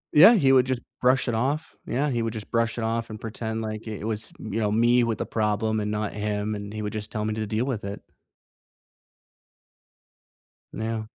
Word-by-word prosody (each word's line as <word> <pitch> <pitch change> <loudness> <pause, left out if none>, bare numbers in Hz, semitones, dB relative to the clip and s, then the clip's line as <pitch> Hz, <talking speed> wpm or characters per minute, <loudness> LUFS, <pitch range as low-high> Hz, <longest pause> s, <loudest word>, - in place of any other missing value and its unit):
Yeah, 185 +10 +10
he 135 -9 +4
would 130 -2 +6
just 130 -2 -1 0.2
brush 130 +2 +3
it 120 - 0
off. 140 +8 -1
Yeah, 145 +4 0
he 120 -1 0
would 115 -1 -2
just 110 -2 -7
brush 115 -1 +1
it 115 - -2
off 115 0 -1
and 110 - -7
pretend 110 0 -4
like 110 0 -4
i - - -4
it 105 - -6
was, 110 -1 -3
you 110 +1 -3
know, 105 -1 +1
me 120 +2 +4
with 115 -2 0
the - - -2
problem 110 0 0
and 105 0 -2
not 105 -1 -2
him, 105 0 -2
and 100 0 -6
he 110 - -4
would 105 - -3
just 105 -1 -5
tell 105 -1 -2
me 110 - -1
to 110 -1 -3
deal 110 +4 0
with 125 -6 -2
it. 100 0 -5 2.7
Yeah. 110 0 -3
110 Hz, 215 wpm, -26 LUFS, 105-120 Hz, 2.7 s, Yeah